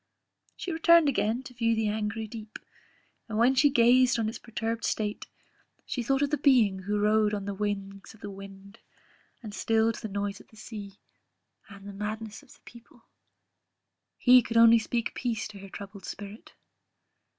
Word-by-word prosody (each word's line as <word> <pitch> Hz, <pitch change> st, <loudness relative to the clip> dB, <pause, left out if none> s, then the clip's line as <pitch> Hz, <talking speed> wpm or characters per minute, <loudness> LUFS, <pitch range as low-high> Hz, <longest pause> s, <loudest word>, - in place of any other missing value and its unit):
She 365 Hz, -, -5 dB
returned 335 Hz, -1 st, +5 dB
again 240 Hz, -2 st, 0 dB
to 255 Hz, -, -11 dB
view 230 Hz, -1 st, +1 dB
the 220 Hz, -1 st, 0 dB
angry 215 Hz, +1 st, -2 dB
deep; 215 Hz, 0 st, -9 dB, 0.7 s
and 215 Hz, -, -3 dB
when 240 Hz, +4 st, +4 dB
she 290 Hz, +2 st, +4 dB
gazed 250 Hz, -1 st, +4 dB
on 225 Hz, -2 st, 0 dB
its 220 Hz, -, -5 dB
perturbed 230 Hz, 0 st, -4 dB
state, 210 Hz, -1 st, -2 dB, 0.6 s
she 250 Hz, -, -3 dB
thought 270 Hz, +4 st, +1 dB
of 285 Hz, -, -1 dB
the 300 Hz, -, 0 dB
Being 235 Hz, -9 st, +4 dB
who 205 Hz, +2 st, -2 dB
rode 210 Hz, 0 st, +2 dB
on 200 Hz, -1 st, -5 dB
the 200 Hz, -, -3 dB
wings 195 Hz, 0 st, -5 dB
of 220 Hz, -, -22 dB
the 205 Hz, -, -6 dB
wind, 195 Hz, +2 st, -12 dB, 0.6 s
and 210 Hz, -2 st, -8 dB
stilled 225 Hz, +1 st, +1 dB
the -, -, -6 dB
noise 200 Hz, 0 st, -4 dB
of -, -, -17 dB
the -, -, -21 dB
sea; 205 Hz, -3 st, -9 dB, 0.7 s
and 200 Hz, -1 st, -12 dB
the 200 Hz, -, -8 dB
madness 215 Hz, +2 st, -5 dB
of 285 Hz, -, -21 dB
the -, -, -19 dB
people 235 Hz, 0 st, -17 dB, 1.1 s
He 250 Hz, -1 st, +6 dB
only 230 Hz, 0 st, +7 dB
could 225 Hz, -, -7 dB
speak 235 Hz, -1 st, -2 dB
peace 235 Hz, -3 st, -3 dB
to 205 Hz, -2 st, -11 dB
her 195 Hz, 0 st, -11 dB
troubled 200 Hz, 0 st, -10 dB
spirit! 205 Hz, +2 st, -9 dB
220 Hz, 175 wpm, -28 LUFS, 205-235 Hz, 1.1 s, only